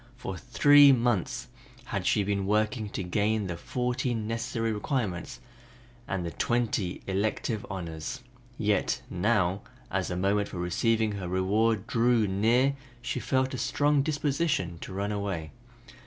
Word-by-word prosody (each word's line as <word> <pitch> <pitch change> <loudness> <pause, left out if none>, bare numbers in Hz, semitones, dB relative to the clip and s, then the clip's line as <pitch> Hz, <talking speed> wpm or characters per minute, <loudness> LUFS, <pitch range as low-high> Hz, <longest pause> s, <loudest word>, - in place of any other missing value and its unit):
For 95 -7 -5
three 145 +8 +6
months 120 -7 0 0.4
had - - -3
she 105 - +3
been 100 -1 -1
working 105 +1 +1
to 100 - -4
gain 105 +3 0
the 90 -2 -3
fourteen 125 +3 -2
necessary 115 0 -1
requirements 105 -5 -2 0.7
and 90 -2 -2
the 85 - -3
twenty 110 -6 -1
elective 105 +2 -1
honors, 90 +6 -5 0.3
yet 105 -3 0
now 95 -1 +1 0.3
as - - 0
the 90 - -3
moment 100 +2 +1
for - - -8
receiving 110 +5 +1
her 100 -3 -4
reward 100 +4 +1
drew 115 -1 +3
near 115 +8 +3 0.3
she - - -2
felt 130 0 0
a 130 - -3
strong 145 0 +2
disposition 140 - 0
to - - -8
run 100 +2 -2
away. 100 -7 -3
105 Hz, 140 wpm, -28 LUFS, 95-120 Hz, 0.7 s, three